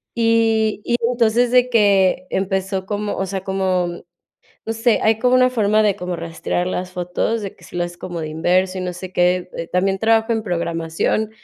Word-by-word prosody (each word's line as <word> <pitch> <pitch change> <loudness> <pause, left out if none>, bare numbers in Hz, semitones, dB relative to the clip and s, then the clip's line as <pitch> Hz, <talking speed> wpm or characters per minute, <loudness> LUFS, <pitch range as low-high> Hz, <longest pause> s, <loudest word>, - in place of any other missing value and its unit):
Y 225 -2 +2
y 240 - 0 0.2
entonces 240 0 +2
de 250 0 +4
que 195 -5 +3
empezó 190 0 -2
como, 205 +1 -3
o 190 - -2
sea, 190 0 -4
como, 185 -2 -1 0.6
no 225 - -1
sé, 225 +1 +2
hay 220 0 +3
como 250 +2 +2
una 255 0 +4
forma 215 -3 +2
de 205 -2 +2
como 180 -2 -4
rastrear 165 +1 -3
las 185 0 -3
fotos, 180 +5 -2
de 195 - -7
que - - -18
si - - -10
lo 175 - 0
haces 175 0 -8
como 175 -2 -6
de 155 - -4
inverso 185 +4 +1
y - - -3
no 180 0 -3
sé 180 +1 -9
qué, 180 0 +1
eh, 165 - -4
también 195 +1 0
trabajo 225 +2 +2
en 225 -1 -1
programación. 170 +3 -1
190 Hz, 200 wpm, -20 LUFS, 180-220 Hz, 0.6 s, de